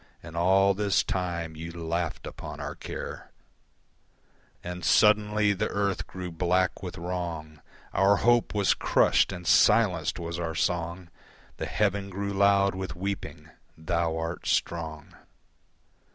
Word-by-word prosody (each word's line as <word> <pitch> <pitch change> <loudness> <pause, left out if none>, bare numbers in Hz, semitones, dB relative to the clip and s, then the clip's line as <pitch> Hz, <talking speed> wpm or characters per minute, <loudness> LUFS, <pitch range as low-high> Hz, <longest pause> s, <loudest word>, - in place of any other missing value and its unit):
And 80 0 -10
all 95 +3 +4
this 100 0 +1
time 85 -3 -3
you 80 +2 -7
laughed 85 0 -3
upon - - -8
our - - -4
care, - - -7 1.3
And 90 0 -6
suddenly 105 +1 +4
the 95 - -1
earth 100 -1 -1
grew 90 -1 -6
black 90 +2 0
with 90 -2 -6
wrong, 85 -4 -5 0.3
Our 100 +1 +4
hope 120 0 +2
was 100 -2 +3
crushed - - +3
and 90 -2 -7
silenced 90 -6 +4
was 85 0 -5
our 80 -2 -3
song, 85 +1 -2 0.5
The - - -4
heaven 100 -1 0
grew 100 +1 -3
loud 100 0 +4
with 95 0 -5
weeping. 100 +2 -5 0.3
Thou 80 0 -1
art 80 +1 -4
strong. 80 -3 -2
90 Hz, 130 wpm, -27 LUFS, 85-100 Hz, 1.3 s, all